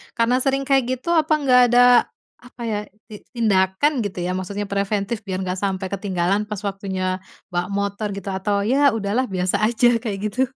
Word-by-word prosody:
karena 230 +1 +2
sering 270 +1 0
kayak 270 -1 +2
gitu 260 +7 -8
apa 315 -2 +3
enggak 265 -4 +4
ada, 240 +1 +4 0.6
apa 245 0 -15
ya, 220 -3 -1 0.3
ti 210 -2 -9 0.2
tindakan 200 +3 +2
gitu 190 -2 -5
ya. 180 - -1
Maksudnya 200 +2 -4
preventif 200 +2 -1
biar 185 -1 -3
nggak 185 0 -3
sampai 190 -1 -2
ketinggalan 195 +1 -1
pas 210 -2 -5
waktunya 190 -2 -3 0.3
bawa 175 0 -1
motor 200 +1 -2
gitu 200 0 -6
atau 200 +1 -1
ya 270 +4 +3
udah 200 -2 -3
lah 260 - +2
biasa 185 -2 -1
aja 240 0 +3
kayak 215 -4 -4
gitu? 255 - -1
205 Hz, 180 wpm, -21 LUFS, 190-240 Hz, 0.6 s, enggak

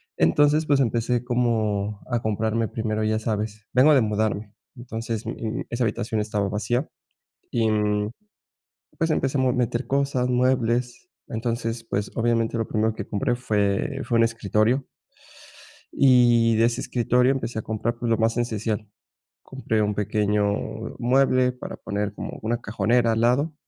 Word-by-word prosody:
Entonces 145 - +3
pues 145 -1 +3
empecé 120 -1 0
como 110 -4 0
a 120 -2 0
comprarme 110 +1 0
primero, 110 -1 -2
ya 110 0 +1
sabes 110 -1 -3
vengo 135 +5 +6
de 135 - +5
mudarme, 105 -1 -1 0.2
entonces, 115 -2 -5
eh, 115 0 -4
esa 120 +1 -1
habitación 110 0 -1
estaba 105 -1 -1
vacía 120 +7 -1 0.6
y, 115 -2 +1
mm, 105 0 0 0.9
pues, 165 -1 +1
empezamos 130 -3 +1
a - - -3
meter 120 +1 -1
cosas, 135 -2 0
muebles, 125 +3 0 0.2
entonces 115 -1 -3
pues, 100 -2 -2
obviamente 115 0 +1
lo 115 - -1
primero 110 0 0
que - - -6
compré 120 +5 0
fue 110 +4 0
fue 120 - +1
un 115 - +5
escritorio, 115 +3 +1 1.1
y 120 -3 +4
de 115 - +4
ese 120 +1 0
escritorio 125 +1 +2
empecé 125 -4 -3
a - - -2
comprar, 115 +2 -2
pues 120 0 -3
lo 115 - +3
más 115 0 +1
esencial, 110 -2 -2 0.6
compré 110 -5 -2
un 105 0 0
pequeño 105 0 +1 0.6
mueble 130 0 +3
para 125 - -8
poner 105 0 -3
como - - -6
una 115 +2 0
cajonera 115 +2 +1
al 110 - 0
lado, 135 +7 +2
115 Hz, 150 wpm, -24 LUFS, 110-125 Hz, 1.1 s, vengo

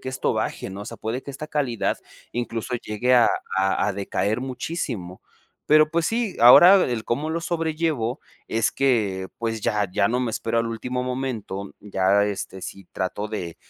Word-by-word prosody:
que 130 - -6
esto 130 - -1
baje, - - -3
¿no? 100 +2 -7
O - - -8
sea, 115 - -8
puede 115 +4 -4
que 140 - -7
esta 155 +3 -7
calidad 130 -8 -1 0.3
incluso 120 +1 -3
llegue 120 +2 -1
a 120 -2 +6 0.3
a 95 +2 +2
a 105 - 0
decaer 100 +3 -1
muchísimo. 125 - -4 0.5
Pero 155 0 +6
pues 165 -1 +1
sí, 230 -3 -1
ahora 175 +11 +10
el 120 -3 -2
cómo 150 +7 -1
lo 165 +1 -1
sobrellevo 160 -7 -1 0.3
es 110 0 +1
que 105 -9 +1
pues 115 -1 -2
ya 105 -1 0
ya - - +2
no 125 +2 0
me 120 -3 -1
espero 115 +2 -1
al 115 - +1
último 125 +2 -3
momento. 120 -7 -4
Ya, 100 0 +2
este, 100 -2 -4
sí 95 -2 -8
trato 100 +3 -3
de 90 -6 -5
115 Hz, 180 wpm, -24 LUFS, 105-135 Hz, 0.5 s, ahora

